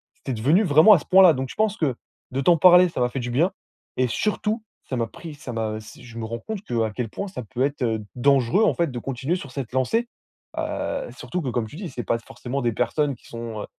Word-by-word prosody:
c'était 135 - -5
devenu 145 - +3
vraiment 160 +4 +7
à 185 - +5
ce - - -13
point-là. 185 -2 +7
Donc 130 -1 -3
je - - -9
pense 215 -1 +1
que, 140 -6 0 0.4
de 135 +1 -1
t'en 170 +5 +5
parler, 180 +2 +7
ça 160 - -4
m'a 125 - +2
fait 130 - -4
du 125 -1 -4
bien 165 +10 +2 0.5
et 130 - +2
surtout, 210 - -1 0.3
ça 130 - -2
m'a 115 -1 0
pris 160 +7 -10
ça 140 -4 -8
m'a, 110 -1 -2
heu, - - -5 0.2
je 120 -2 -12
me 115 - -4
rends 115 +1 -5
compte 210 - -6
qu'à 115 - -1
quel 120 -3 -3
point 200 - -5
ça 185 -10 -6
peut 125 +3 -2
être, 145 +1 -2
heu, 110 -2 0
dangereux, 135 - +3
en - - +4
fait, 170 -5 0
de 125 - -4
continuer 135 +6 -2
sur 140 -6 -9
cette 130 -3 -5
lancée, 225 - +1 0.5
heu, - - -3
surtout 180 - -4
que, 135 - -3
comme 120 -2 -1
tu 125 - -12
dis, 185 -2 -5
c'est 125 -3 -5
pas 115 - +1
forcément 125 +3 -5
des 120 -2 +1
personnes 135 +5 0
qui - - -20
sont, 115 -2 -6
heu, - - -5
135 Hz, 255 wpm, -24 LUFS, 120-175 Hz, 0.5 s, vraiment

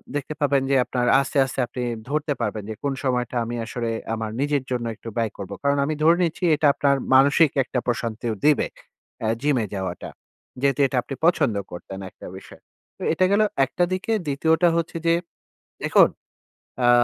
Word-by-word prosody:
দেখতে 145 +1 -3
পাবেন 140 -2 +3
যে - - +4
আপনার 125 -1 -1
আস্তে, 140 +1 -4
আস্তে 130 - -6
আপনি 125 +1 -5 0.3
ধরতে 150 0 0
পারবেন 105 -2 -2
যে, 110 - -4
কোন 140 -1 0
সময়টা 125 -2 -1
আমি 120 +1 -4
আসলে 115 0 -3 0.3
আমার 110 -1 -4
নিজের 145 -1 0
জন্য 120 -1 -1
একটু 115 - -9
ব্যয় 115 -2 0
করবো। 100 0 -6
কারণ 140 0 +2
আমি 155 - -1
ধরে 165 +2 +5
নিচ্ছি 170 +2 -2
এটা 150 - +2
আপনার 140 -1 +2 0.2
মানসিক 140 +3 +5
একটা 125 - -2
প্রশান্তিও 115 -1 -2
দিবে, 150 -1 +4 0.5
অ্যা 110 - 0
জিমে 140 -6 +1
যাওয়াটা। 95 -2 -4 0.5
যেহেতু 140 0 +1
এটা 130 - -3
আপনি 130 +3 -7
পছন্দ 150 - +3 0.2
করতেন 95 +2 -8
একটা - - -12
বিষয়। - - -14 0.4
তো - - -18
এটা 185 +3 +3
গেল 200 +1 +4 0.2
১ 135 - -17
টা 175 - +4
দিকে। 185 +4 -2 0.2
২য় 145 +3 +1
টা 175 - +7
হচ্ছে 165 0 -2
যে, 165 - +5 0.7
দেখুন - - +5 0.7
অ্যা 120 -1 +5
135 Hz, 185 wpm, -23 LUFS, 115-150 Hz, 0.7 s, টা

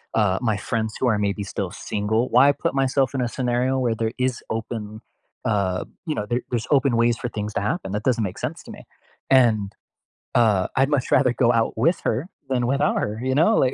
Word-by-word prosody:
uh, 105 -4 +2
my 110 -4 +1
friends 110 0 -2
who 130 - +1
are 110 -3 +2
maybe 100 0 -1
still 95 -1 -4
single. 105 +3 -1
Why 130 +4 +6
put - - -2
myself 135 -1 +1
in 135 - -1
a 125 - 0
scenario 125 +1 0
where 120 -3 0
there 110 0 -2
is 125 -1 -1
open, 110 -1 -5 0.4
uh, 100 -4 0 0.2
you 155 -3 -2
know, 105 - -2
there 120 +4 -1
there's 120 -3 -2
open 135 -4 +3
ways 115 0 +3
for 125 - -4
things 105 -2 -5
to - - 0
happen, 100 -2 -2
that 105 +1 -2
doesn't 115 -3 +1
make 95 -3 -4
sense - - -4
to - - -11
me. - - -11 0.5
And, 110 -6 +3 0.6
uh, 105 -6 +3
I'd 135 +1 +3
much 145 -4 0
rather 130 -2 +4
go 120 -1 +3
out 115 -1 +1
with 165 +10 +2
her 130 +11 -1 0.2
than 125 -2 +1
without 140 +3 +1
her, 105 +1 -3
you 130 0 0
know, 165 +10 +4
like, 130 0 +2
120 Hz, 220 wpm, -23 LUFS, 105-130 Hz, 0.6 s, Why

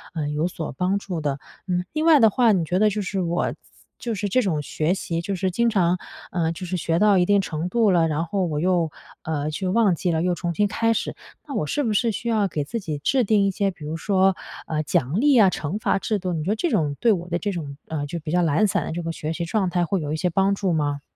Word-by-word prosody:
呃， 155 -3 -2
有 150 +3 0
所 165 -3 -5
帮 180 +8 0
助 180 -5 -5
的。 145 -2 -2 0.3
嗯， 180 -1 0
另 310 +1 0
外 320 -3 +7
的 225 -3 +6
话， 240 -1 +4
你 180 -5 +1
觉 180 +3 0
得 215 +1 +5
就 210 +1 -2
是 190 0 -2
我 175 0 -1 0.5
就 235 -2 -3
是 205 0 -2
这 255 +7 +3
种 170 -9 0
学 155 +4 -1
习， 170 -3 -3
就 195 +3 -3
是 185 0 -1
经 235 +6 +2
常， 180 -5 +2 0.3
呃， 165 -2 0
就 180 +2 -7
是 180 +1 -2
学 165 0 0
到 210 -2 +5
一 180 - +4
定 200 +1 +3
程 165 -2 -3
度 225 -1 +3
了， 170 -2 +3
然 155 +1 -1
后 190 +2 -1
我 155 -3 -2
又， 175 -1 +1 0.3
呃， 155 -1 -2
去 185 +5 -3
忘 200 -1 +3
记 175 - -2
了， 160 -1 0
又 180 0 +1
重 175 0 -3
新 205 +5 +2
开 230 +3 +1
始， - - -3 0.3
那 285 - -6
我 150 - -1
是 290 - 0
不 230 - 0
是 230 +3 +2
需 235 +3 -4
要 215 -3 +2
给 155 -5 -2
自 195 +11 -4
己 155 -7 -4
制 255 - +2
定 205 -1 +3
一 195 - +2
些， 195 +1 0
比 170 -4 -13
如 155 +2 -3
说， 190 +1 +2 0.3
呃， 155 -1 -1
奖 145 +3 0
励 280 0 +4
啊， 200 -4 +7
惩 165 +2 -3
罚 195 - +1
制 215 - -1
度， 185 -2 -3
你 155 -2 -2
觉 190 - -2
得 215 - +2
这 345 - -1
种 150 -9 +1
对 235 - +5
我 175 -4 -1
的 175 -1 -1
这 205 - -2
种， 150 -6 -5
呃， 150 -2 -2
就 170 - -4
比 155 0 -5
较 180 - +3
懒 165 +5 +3
散 - - 0
的 - - -4
这 175 - -4
个 165 - -2
学 160 -1 -4
习 170 +1 -3
状 190 +2 0
态 175 0 +1
会 190 +3 0
有 150 0 -3
一 - - 0
些 180 +3 0
帮 195 +3 +2
助 195 -2 -1
吗？ 145 -3 0
180 Hz, 300 characters per minute, -23 LUFS, 160-205 Hz, 0.5 s, 外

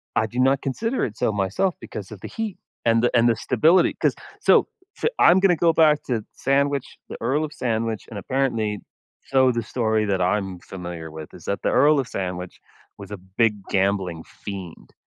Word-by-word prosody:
I 110 - +2
do 120 +3 -5
not 135 +1 +3
consider 225 - -1
it 110 -1 -7
so, - - +1
myself 100 - 0
because 100 -1 -8
of 105 -4 -10
the - - -6
heat 220 -4 -4 0.3
and 115 0 +3
the 120 - +2
and 120 0 +5
the 115 - +3
stability, 145 +11 +3
'cause - - +1 0.3
so - - +5 0.3
so - - -1
I'm 175 +2 +7
gonna 190 -2 +4
go 165 +1 +3
back 155 -2 +4
to 115 -4 -2
sandwich 140 0 0
The - - -6
Earl 135 +7 +1
of 150 - -9
Sandwich, 115 -2 -2
and 110 - -7
apparently 115 -4 -1 0.5
so 130 -1 +4
the 120 -1 -2
story 110 -2 0
that 95 -2 0
I'm 95 0 0
familiar 85 -3 -8
with 80 -1 -9
is - - -13
that - - -2
the - - +1
Earl 150 0 +4
of 130 - -2
Sandwich 90 -4 -5 0.4
was 100 0 -10
a 105 - -5
big 100 +3 0
gambling 95 -4 0
fiend. 95 -5 -9
115 Hz, 195 wpm, -23 LUFS, 100-135 Hz, 0.5 s, I'm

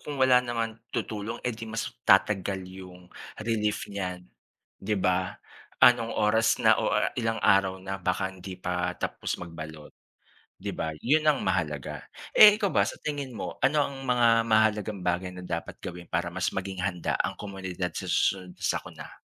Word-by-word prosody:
kung 145 -1 -6
wala 130 -2 +5
naman 115 -2 -3
tutulong 110 -1 -4
'di 115 -2 -3
mas 115 +1 -3 0.2
tatagal 95 -1 +3
yung 90 -1 -12 0.2
relief 105 -1 -1
niyan, 90 -2 -4 0.6
'di 105 +2 -1
ba? 90 -1 0 0.5
Anong 115 -2 +5
oras 110 +1 +3
na - - +5
o - - +1 0.3
ilang 115 -1 0
araw 95 -2 +4
na 95 +1 -5
baka 95 +1 -1
hindi 95 0 -9
pa 90 0 -2
tapos - - -3
magbalot 80 -3 -9 0.7
'di - - -3
ba? 80 -1 -3
'Yun 155 +5 +2
ang 150 -2 +3
mahalaga, 80 -7 -2 0.3
eh, 210 -1 +11
ikaw 200 - +2
ba - - +3
sa - - -6
tingin 145 -4 -4
mo 105 - -6
ano 150 +2 +3
ang 135 -1 -8
mga 125 -2 +3 0.2
mahalagang 110 -2 +2
bagay 90 +1 -1
na 90 - -8
dapat 85 -2 -5
gawin 90 0 -7
para 90 0 -1
mas 90 +1 -2
maging 95 0 -4
handa 90 -3 -1
ang - - -3
komunidad 95 -3 -4
sa - - -4
susunod 90 -2 0
sakuna? - - -3
95 Hz, 160 wpm, -27 LUFS, 90-115 Hz, 0.7 s, eh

